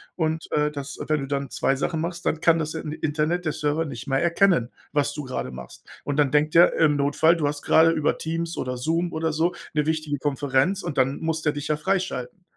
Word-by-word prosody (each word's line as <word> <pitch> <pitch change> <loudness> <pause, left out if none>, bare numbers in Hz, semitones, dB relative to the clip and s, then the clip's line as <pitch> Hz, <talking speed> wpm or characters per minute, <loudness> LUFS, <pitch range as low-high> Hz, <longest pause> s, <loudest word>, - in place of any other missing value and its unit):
Und, 160 -1 -2
äh, 150 0 +2
das 140 -2 -7
wenn 155 -2 +1
du 135 - -5
dann 140 -1 -2
2 135 - 0
Sachen 160 +2 -1
machst, 170 +1 -4
dann 160 - 0
kann 165 -1 +4
das, 155 0 -3
äh, 160 - -4
Internet, 155 +3 -2
der 155 - 0
Server 150 +2 -1
nicht 135 -3 -7
mehr 135 0 +1
erkennen, 170 - +3 0.2
was 145 -1 0
du 150 0 -5
gerade 130 - -4
machst. 65 -1 -11 0.2
Und 145 0 -3
dann 145 -2 +3
denkt 150 +2 +2
der, 175 +1 +7
im 150 -3 +3
Notfall, 155 +4 +3
du 150 - 0
hast 145 0 -3
gerade 160 +1 +5
über 155 -2 0
Teams 165 +1 -3
oder 125 0 -3
Zoom 155 +7 -1 0.2
oder 160 0 -1
so 165 +3 +1 0.2
'ne 150 -1 +2
wichtige 155 -2 -1
Konferenz 145 +7 0
und 170 -5 -5
dann 135 +1 +2
muss 160 -1 -2
der 150 - +2
dich 145 -1 -5
ja 150 -1 0
freischalten.“ 180 -3 -2
150 Hz, 230 wpm, -24 LUFS, 145-165 Hz, 0.2 s, der